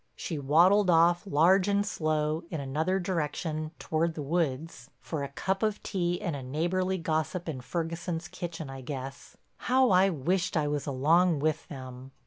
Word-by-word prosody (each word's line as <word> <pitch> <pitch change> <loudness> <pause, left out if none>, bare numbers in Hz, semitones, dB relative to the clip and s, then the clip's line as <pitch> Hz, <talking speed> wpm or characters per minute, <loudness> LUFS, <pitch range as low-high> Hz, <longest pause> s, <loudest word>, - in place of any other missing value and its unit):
She 160 -4 -4
waddled 180 +8 +4
off, 175 +3 +4
large 180 +4 +4
and 200 0 +2
slow, 155 -3 -1
in 160 - -4
another 155 +8 0
direction, 155 -3 -2
toward 160 +1 -1
the 150 - -4
woods—for 155 -1 -3
a 140 - -4
cup 190 +7 -2
of 215 -2 -1
tea 175 -2 -1
and 175 -7 -3
a 140 - -5
neighborly 175 +8 -1
gossip 165 +1 -2
in 140 -5 -4
Ferguson's 165 +3 -3
kitchen, 165 -3 -6
I 135 0 -8
guess. 135 0 -7 0.2
How 255 -2 +3
I 185 +1 +5
wished 175 +3 0
I 150 -1 +1
was 145 -1 -2
along 160 +5 +3
with 155 +2 -1
them! 130 -1 -9
165 Hz, 160 wpm, -29 LUFS, 145-180 Hz, 0.2 s, I